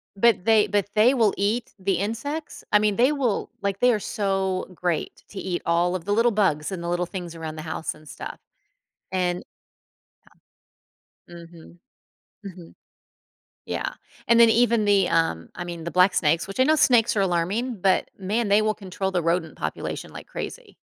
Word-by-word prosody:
But 210 -3 +3
they 220 -2 +4
but 200 -1 0
they 225 +5 +5
will 225 -6 +3
eat 215 +4 -1
the 195 +1 0
insects. 230 - -4
I 210 - +7
mean, 210 -1 +1
they 250 +4 +4
will 250 -8 -1
like, 200 -1 -2
they 245 -1 +4
are 210 - 0
so 195 -3 -1
great 175 -3 -3
to 195 - -8
eat 180 -2 -3
all 175 +2 +2
of 170 - -4
the 205 - -3
little 230 +2 +3
bugs 170 -7 +1
and 175 -2 -5
the 170 - -3
little 175 0 0
things 175 -2 -7
around 160 -1 -6
the 155 - -6
house 160 0 -4
and 155 0 -17
stuff, - - -8 0.7
and 180 -1 -1 1.9
um, 175 - -10 0.2
mhm, 170 +1 -15 0.7
mhm. 180 -3 -11 0.9
Yeah. - - -3 0.3
And, 235 0 +5
then, 230 -1 +8
even 235 -1 +3
the 200 -3 +4
um, 165 - 0
I 175 - -5
mean, 170 -2 -7
the 170 - -4
black 180 +1 +4
snakes 160 +2 +2
which 195 +6 -8
I - - +7
know 310 +3 +4
snakes 245 -7 +4
are 200 - +2
alarming, 195 +7 -1
but, 190 -1 +2
man, 210 +4 -1
they 205 +2 +5
will 215 0 +1
control 190 -1 -4
the 180 -2 0
rodent 165 -1 -1
population - - -5
like - - -10
crazy. - - -7
195 Hz, 185 wpm, -24 LUFS, 175-220 Hz, 1.9 s, then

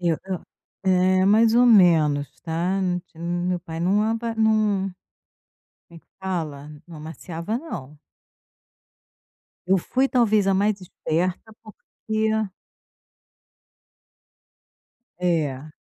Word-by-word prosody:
Eu 170 -3 +1
eu 190 -2 -4 0.4
é, 185 0 +3
mais 220 +2 +5
ou 245 +1 +6
menos, 155 - +4
tá, 175 +4 -1 0.3
ti 160 - -22
meu 175 +1 -1
pai 165 -1 -7
não 195 +4 +2
ava 225 +1 -1
não 215 -3 +2 1.0
como 170 - -14
é - - -13
que - - -39
fala? 155 -6 -4 0.2
Não 165 -3 -10
amaciava 165 +6 -5
não. 150 - -8 1.7
Eu 190 0 +4
fui 260 +9 0
talvez 215 -5 +3
a 195 - +3
mais 205 0 +1
esperta, 180 +4 -3
porque 220 0 -4 2.9
É. 155 -5 -1
185 Hz, 105 wpm, -23 LUFS, 165-215 Hz, 2.9 s, ou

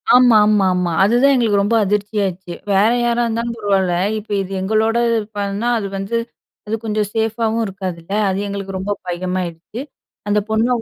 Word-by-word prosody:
ஆமா, 245 -3 +6
ஆமா, 210 -2 +3
ஆமா. 180 -1 0
அதுதான் 245 +7 +4
எங்களுக்கு 215 -5 +2
ரொம்ப 220 +3 +1
அதிர்ச்சியாச்சு. 200 -3 -2 0.2
வேற 195 +3 +4
யாரா 240 0 +1
இருந்தாலும் 230 +1 -2
பரவால்ல. 195 -4 +1 0.3
இப்ப 210 0 -13
இது 190 0 -6
எங்களோட 220 +3 +1
இது 230 - +2 0.2
பண்ணா, 200 +3 -2
அது 200 - -3
வந்து 195 +4 -3 0.5
அது 220 - -1
கொஞ்சம் 210 -1 -1
சேஃப்பாவும் 225 0 0
இருக்காதுல்ல. 185 -2 -6 0.2
அது 190 +1 -1
எங்களுக்கு 195 -1 -5
ரொம்ப 195 +2 -3 0.2
பயமாயிருச்சு. 180 +4 -4 0.5
அந்தப் 205 0 +1
பொண்ண 220 +2 +2
205 Hz, 155 wpm, -19 LUFS, 190-225 Hz, 0.5 s, ஆமா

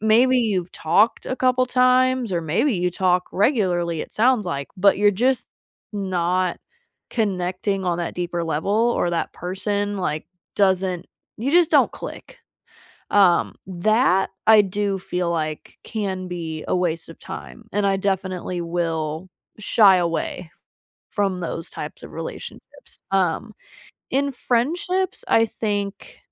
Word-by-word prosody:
maybe 240 +4 +4
you've 195 -7 -1
talked 200 +8 +2
a 260 - -2
couple 255 0 +2
times- 255 -2 +3
or 170 - 0
maybe 170 - +1
you 180 0 0
talk 180 0 +1
regularly, 180 - +1
it - - -7
sounds 235 -2 +2
like- 140 -5 -3
but 195 +1 +4
you're 205 0 +5
just 245 +6 0 0.4
not 185 -2 0 0.5
connecting 190 -2 -1
on 175 -1 0
that 170 - -3
deeper 175 -1 -2
level 200 +9 +1
or 175 - +1
that 170 - -2
person 205 +3 -2
like, 155 -4 -2 0.3
doesn't 190 -2 +1 0.3
you 245 +5 -1
just 345 -1 +5
don't - - +4
click. - - -9 0.7
Um, 190 -4 +4
that 195 +2 +2 0.2
I 220 -1 +8
do 200 0 -1
feel 180 -2 -2
like 155 -2 -4
can 190 -4 -3
be 165 -3 -5
a - - +1
waste 170 -3 -1
of 165 - -11
time 220 +3 -9
and 205 0 +1
I 195 0 +2
definitely 185 -2 -2
will 165 0 -2 0.3
shy 200 -2 +5
away 170 0 -2 0.6
from 195 -3 0
those 165 -1 -5
types - - -7
of - - -10
relationships. - - -9
Um, 195 +3 0 0.6
in 280 +1 +1
friendships, 350 - -1
I 225 - +5
think 205 -2 -4
190 Hz, 135 wpm, -22 LUFS, 175-220 Hz, 0.7 s, I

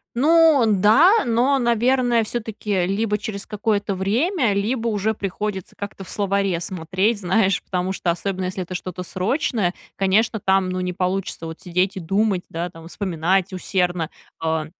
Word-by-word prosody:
Ну 310 0 +5
да, 225 - +5
но, 245 +4 +2
наверное, 240 -1 +2
всё-таки, 215 -5 -2
либо 210 +3 0
через 205 -2 -6
какое-то 205 -1 -1
время, 235 - +1
либо 225 +4 -1
уже 215 0 0
приходится 200 -1 -4
как-то 200 -1 -7
в 185 - -12
словаре 195 -3 0
смотреть, 185 +5 -1
знаешь, 190 +2 +2
потому 185 0 -2
что, 175 -2 0
особенно 185 +2 -3
если 185 0 -3
это 180 +1 -7
что-то 180 0 -5
срочное, 200 - -1 0.2
конечно, 210 +3 +1
там 190 -1 +3
ну 185 0 -2
не 180 - -2
получится, 180 -1 -2
вот, 160 0 -8
сидеть 180 +3 0
и 190 - -5
думать, 195 +2 +1
да, 170 +2 -3
там, 165 -1 -12
вспоминать 185 0 0
усердно, 180 -3 -1 0.3
э, 160 -1 0
195 Hz, 155 wpm, -22 LUFS, 185-225 Hz, 0.3 s, Ну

